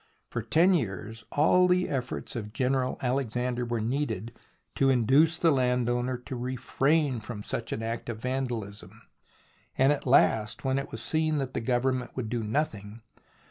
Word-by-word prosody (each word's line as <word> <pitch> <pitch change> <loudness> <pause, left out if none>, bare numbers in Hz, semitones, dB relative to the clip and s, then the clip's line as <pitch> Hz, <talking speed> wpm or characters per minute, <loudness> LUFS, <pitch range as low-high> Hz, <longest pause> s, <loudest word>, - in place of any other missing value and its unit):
For - - -2
ten 175 +4 +4
years 110 - -3
all 180 +5 +4
the 180 0 +2
efforts 130 -2 -4
of 105 -2 -5
General 130 0 0
Alexander 125 -1 -1
were 120 -1 -2
needed 115 -3 -2 0.4
to 135 - +2
induce 135 +6 +4
the 170 -2 +4
landowner 125 -1 +1
to 125 +2 -8
refrain 130 +3 0
from 105 -1 -7
such 115 - -4
an 110 - -3
act 115 +1 -4
of 115 -2 -4
vandalism, 115 -5 -4 0.7
and 135 +2 +5
at 140 - -5
last, 110 -4 +3
when 135 +1 +1
it 140 - -6
was 115 - -6
seen 155 -1 +1
that 135 -2 -3
the - - -2
Government 125 +2 0
would 120 -4 -3
do 120 -1 -1
nothing. 110 -3 -3
125 Hz, 160 wpm, -28 LUFS, 115-135 Hz, 0.7 s, and